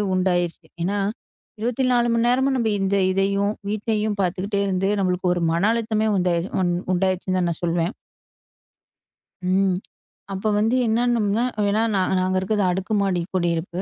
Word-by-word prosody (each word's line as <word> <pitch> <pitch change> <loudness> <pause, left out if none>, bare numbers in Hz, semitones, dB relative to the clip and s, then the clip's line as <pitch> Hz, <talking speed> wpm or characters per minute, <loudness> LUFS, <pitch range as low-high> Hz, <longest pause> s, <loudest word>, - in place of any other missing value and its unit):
உண்டாயிருச்சு. 175 -3 0 0.2
ஏன்னா 200 +4 0 0.6
24:00 245 +1 +1
மணி 230 +1 +2
நேரமும் 265 +2 +2
நம்ம 230 -3 +1
இந்த 195 +1 +1 0.2
இதையும், 200 +2 +1 0.2
வீட்டையும் 215 0 -1
பாத்துக்கிட்டே 190 +3 -1
இருந்து 195 0 0
நம்மளுக்கு 185 -1 0
ஒரு 175 - -2
மன 170 +4 +1
அழுத்தமே 220 -1 0
உண்டாயிருச்சு 180 -1 0 0.4
உண்டாயிருச்சுன்னு 185 0 0
தான் 175 -1 +1
நான் 165 - -7
சொல்லுவேன். 170 +3 0 1.6
ம். 190 -1 +2 0.6
அப்போ 195 +3 -3
வந்து 225 +4 +2
என்னா 225 +2 +2
நம்மன்னா, 215 0 +1 0.3
ஏன்னா 215 +2 +2
நா - - +2 0.2
நாங்க 185 0 0
இருக்குறது, 205 +2 0
அடுக்குமாடி 195 0 0
குடியிருப்பு. 175 0 -1
195 Hz, 135 wpm, -23 LUFS, 180-215 Hz, 1.6 s, மணி